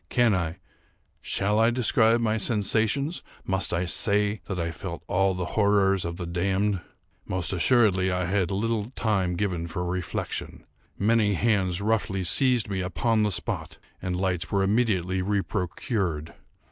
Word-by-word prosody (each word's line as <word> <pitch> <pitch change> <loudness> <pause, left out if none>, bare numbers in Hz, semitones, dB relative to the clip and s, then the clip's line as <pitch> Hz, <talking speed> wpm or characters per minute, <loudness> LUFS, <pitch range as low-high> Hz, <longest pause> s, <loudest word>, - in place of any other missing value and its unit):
Can 120 -4 +3
I—shall 95 +3 -4
I 115 +1 +5
describe 120 -1 +3
my 110 -1 +1
sensations? 115 - +1 0.2
Must 95 0 +1
I 85 +1 0
say 105 +3 +2
that 95 -2 -4
I 85 0 -2
felt 85 +1 -7
all 95 0 +1
the 90 -1 -3
horrors 100 -3 +3
of 85 0 -4
the 90 - -5
damned? 95 +3 0 0.5
Most 90 0 0
assuredly 95 -2 +3
I 90 0 -1
had 95 0 0
little 110 +2 -1
time 95 -5 0
given 90 -3 -2
for 90 +2 -4
reflection. 90 -3 -4 0.3
Many 105 -1 +2
hands 95 -3 +1
roughly 100 -3 0
seized 125 +4 +2
me 95 -2 -2
upon 110 +5 0
the 105 - +2
spot, 85 -3 -3 0.2
and 90 -1 -2
lights 95 -2 -1
were 100 -1 +2
immediately 95 -4 +1
reprocured. 95 - -2
95 Hz, 145 wpm, -26 LUFS, 90-110 Hz, 0.5 s, I